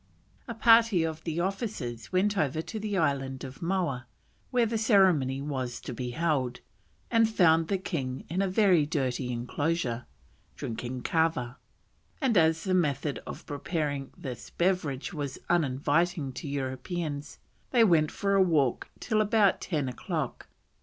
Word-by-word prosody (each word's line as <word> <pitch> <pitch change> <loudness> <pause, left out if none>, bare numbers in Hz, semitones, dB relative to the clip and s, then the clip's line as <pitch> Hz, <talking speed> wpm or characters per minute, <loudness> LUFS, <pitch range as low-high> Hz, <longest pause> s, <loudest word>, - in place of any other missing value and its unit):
A 235 - -5
party 225 -5 +5
of 160 -1 -3
the 165 0 -2
officers 185 - -4
went 200 +3 +2
over 155 -4 0
to 220 - -6
the 205 -2 -2
island 135 -5 0
of 135 0 -9
Moa, 170 -9 -1 0.4
where 245 -2 +3
the 225 +1 -2
ceremony 180 - +3
was 130 -4 -3
to - - -6
be 125 +1 -4
held, 130 -3 0 0.5
and 230 -1 +4
found 165 -6 +4
the 195 - +1
king 135 -9 -4
in 180 +4 -1
a 195 - +1
very 185 -4 +4
dirty 130 -4 -1
enclosure, 125 0 -2 0.5
drinking 120 +2 -5
kava; 160 -7 0 0.6
and 260 -6 +1
as 160 -2 +4
the 190 - 0
method 150 -4 0
of - - -8
preparing 145 -2 -3
this 135 -9 -7
beverage 170 -7 -1
was 145 -4 -4
uninviting 145 -1 +1
to 145 - -7
Europeans, 140 +3 -4 0.3
they 240 -3 +5
went 165 -7 +4
for 200 -1 -1
a 195 - +5
walk 150 -9 +2
till 215 -2 +1
about 210 -2 +3
ten 150 -7 -1
o'clock. 125 - -4
160 Hz, 145 wpm, -28 LUFS, 135-190 Hz, 0.6 s, party